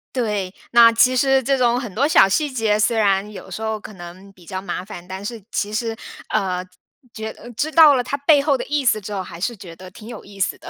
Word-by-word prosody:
对。 210 -6 -2 0.2
那 235 -1 +7
其 250 +3 +4
实 270 +1 +3
这 275 +2 +1
种 245 -1 +2
很 235 -7 -7
多 270 +8 +1
小 245 -10 +6
细 295 +9 +1
节 220 -5 0
虽 225 +2 +2
然 200 -1 +1
有 - - -11
时 - - -6
候 220 0 -2
可 210 0 -11
能 185 +2 -12
比 180 -3 -20
较 185 +1 -5
麻 190 -2 -5
烦， 175 -4 -10
但 190 +2 -8
是 220 0 -7
其 210 +1 -2
实， 225 +1 -2 0.4
呃， 185 -4 -1 0.5
觉 220 0 -6 0.2
知 310 - 0
道 315 -3 +7
了 255 - +1
它 275 - -3
背 285 0 +4
后 280 -1 +1
的 - - -4
意 295 -2 -1
思 215 -3 +2
之 205 - -8
后， 195 - -2
还 175 -2 -10
是 235 +4 -2
觉 175 -3 -11
得 185 +1 -12
挺 215 +3 -13
有 235 - -9
意 200 0 -14
思 190 - -1
的。 - - -11
215 Hz, 270 characters per minute, -20 LUFS, 195-250 Hz, 0.5 s, 那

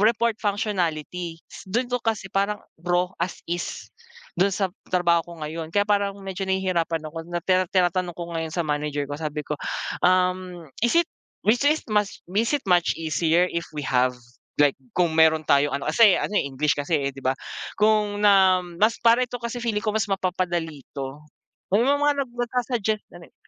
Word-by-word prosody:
report 230 +1 +3
functionality, 180 -5 -2 0.3
dun 240 +6 0
ko 250 - 0
kasi 220 -4 -2
parang 200 +2 +1 0.2
raw 175 +1 +2 0.2
as 180 - -1
is, 175 +1 -5 0.4
dun 195 +2 +4
sa 190 -1 -1 0.2
trabaho 170 -2 +3
ko - - -8
ngayon, 160 +1 -5
kaya 205 +3 +2
parang 200 -1 +1
medyo 190 0 -4
nahihirapan 170 -4 0
ako. 165 -1 -6
Na 175 0 -2
tira 185 -1 +2
tinatanong 180 -1 +1
ko 170 -1 -6
ngayon 160 -1 -3
sa 170 0 -1
manager 150 -1 -1
ko 145 +2 -5
sabi 150 -1 -3
ko, - - -4 0.5
um, 180 -1 +1 0.2
"Is 240 +7 +2
it 340 0 +4 0.4
which 240 +6 +3
is 310 +1 +1
much, 210 -1 0
is 225 +6 +1
it 280 - -9
much 175 -2 +3
easier 165 +2 +2
if 170 0 -3
we 145 - -3
have?" 125 -1 +2 0.4
like, 145 -2 +4 0.2
kung 175 -3 +2
meron 160 -1 +5
tayong 145 0 +3
ano, 140 - -4
kasi 220 -5 +7
ano - - -2
eh, - - 0
English 145 +2 +1
kasi 145 -1 0
di 135 - -10
ba, 130 +1 +1 0.4
kung 210 -1 +2
na 190 -2 +6 0.2
mas 225 +2 +4
para 235 +1 +5
ito 245 0 -6
kasi 235 +1 -4
feeling 220 -3 -1
ko 215 - +1
mas 220 0 0
mapapadali 175 -5 -1 0.2
'to, 135 +1 -5 0.5
may 205 - +5
mga 285 0 +2
nagsa-suggest, 240 -3 -1 0.2
ano 175 - -12
eh. - - -37
185 Hz, 180 wpm, -24 LUFS, 165-210 Hz, 0.5 s, kasi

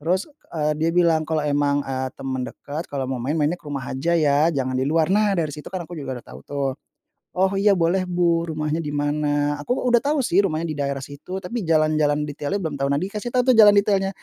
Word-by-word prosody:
Terus, 180 - 0 0.2
eee, 150 -2 0
dia 165 - +2
bilang, 165 -3 +3
"Kalau 160 -1 +1
emang, 145 0 +1
eee, 130 -1 -2
temen 130 -1 -3
deket 150 +4 -6
kalau 135 -2 -2
mau 130 - -2
main, 135 +4 -1
mainnya 155 +4 +1
ke - - -29
rumah 140 -2 -3
aja 140 +6 -1
ya, 150 +1 +3
jangan 130 -2 -1
di 130 - +1
luar." 160 0 +2
Nah, 210 0 +3
dari 155 -2 0
situ 150 - -9
kan 185 -2 -3
aku 175 - -8
juga 130 -3 -5
udah - - -33
tahu - - -11
tuh. 140 -1 -2 0.7
"Oh, 190 +1 +2
iya, 205 0 +5
boleh 175 +3 +2
Bu, 170 -1 +1
rumahnya 155 +1 -2
di 150 - -4
mana?" 145 0 0
Aku 245 - -1
u - - -3
udah 240 - +5
tahu 290 +1 +1
sih 195 0 +4
rumahnya 160 -2 -1
di - - -2
daerah 140 -1 -2
situ, 145 +6 -7
tapi 235 +6 -3
jalan-jalan 155 -2 +2
detailnya 145 +5 -3
belum 155 -5 -3
tahu, 140 - +2
nah 140 - +2
dikasih 210 +5 -4
tahu 255 0 +4
tuh - - +2
jalan 205 -1 +9
detailnya. 195 -1 +2
155 Hz, 235 wpm, -23 LUFS, 145-180 Hz, 0.7 s, jalan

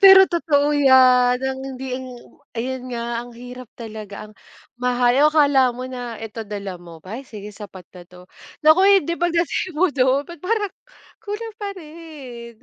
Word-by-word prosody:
Pero 385 -1 +10
totoo 295 -4 +1
'yan 255 -3 +5
ang 265 0 -2
hindi 265 -1 -6 0.6
ayun 255 +2 -3
nga 235 0 -3
ang 245 - -10
hirap 250 0 -10
talaga 215 -3 -8
ang 215 - -16 0.5
mahal 245 -1 +2
oo, - - +7
akala 285 -5 +4
mo 255 - -5
na 245 -3 -6
eto 225 0 -7
dala 200 -3 -6
mo, 170 -2 -13
"B - - -17
ay, 245 - -5
sige 210 -1 -9
sapat 200 -3 -11
na 180 - -10
'to." 180 0 -15 0.4
Naku, 310 +4 +7 0.2
hindi 335 - -3
pagdating 345 0 0
mo 370 +4 +4
do'n, 265 +1 +2
ba't 340 -3 -10
parang 410 +1 -1 0.5
kulang 440 +1 -6
pa 405 - -3
rin, 300 -9 -10
255 Hz, 165 wpm, -21 LUFS, 235-310 Hz, 0.6 s, Pero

